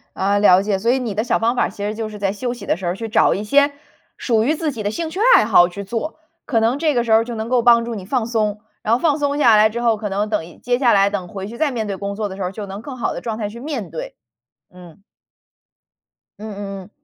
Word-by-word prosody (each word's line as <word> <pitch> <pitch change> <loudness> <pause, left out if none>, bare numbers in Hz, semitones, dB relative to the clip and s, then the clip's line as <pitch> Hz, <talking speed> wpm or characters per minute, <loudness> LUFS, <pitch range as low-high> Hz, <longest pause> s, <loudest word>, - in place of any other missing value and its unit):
啊， 200 +1 +1
了 190 -2 +6
解。 200 -1 0
所 230 +4 +2
以 265 - +1
你 235 -5 -3
的 215 - 0
小 - - +1
方 230 +2 +1
法 - - +2
儿 - - 0
其 200 - -7
实 210 +1 -2
就 220 0 -4
是 210 - -9
在 195 -1 0
休 240 +4 -3
息 235 -5 -10
的 - - 0
时 185 - -7
候， 175 - 0
去 225 +2 -6
找 - - +3
一 205 - -3
些 285 +6 +3 0.5
属 225 -3 +1
于 295 - +2
自 310 -1 -2
己 230 -5 -6
的 205 - 0
兴 330 +7 -3
趣 365 - -6 0.2
爱 - - +5
好 175 - +5
去 200 +3 -7
做， 235 +11 -4 0.3
可 235 -6 +1
能 230 +4 +1
这 310 -2 +2
个 240 - +1
时 230 - -3
候 220 - +7
儿 225 - 0
就 240 -1 -6
能 220 +1 -4
够 250 -2 +3
帮 235 -1 +6
助 235 0 -5
你 190 -3 -7
放 245 +1 -1
松， 215 -3 -1 0.2
然 220 - +1
后 240 - +3
放 310 -3 +2
松 285 0 -1
下 235 -7 +5
来 215 +1 +5
之 235 +2 -4
后， 230 -2 +2
可 210 -1 -4
能 205 +2 -1
等 210 -7 -1
一 170 - -15
接 245 0 0
下 245 -5 +4
来 195 0 +4
等 200 -3 -4
回 195 +2 -7
去 235 +3 -9
再 305 0 +1
面 225 -4 -3
对 195 - -4
工 200 +1 -4
作 210 -1 -3
的 190 - -7
时 195 - -5
候， 180 - -2
就 205 +1 -7
能 195 +2 -7
更 270 +1 -8
好 240 - -1
的 - - -6
状 225 -2 -4
态 210 -2 -3
去 235 - -10
面 255 - -5
对。 160 - -7 0.6
嗯。 180 0 -15 1.4
嗯 215 +1 -7
嗯 195 -1 -6
嗯， 180 - -17
220 Hz, 320 characters per minute, -20 LUFS, 200-240 Hz, 1.4 s, 候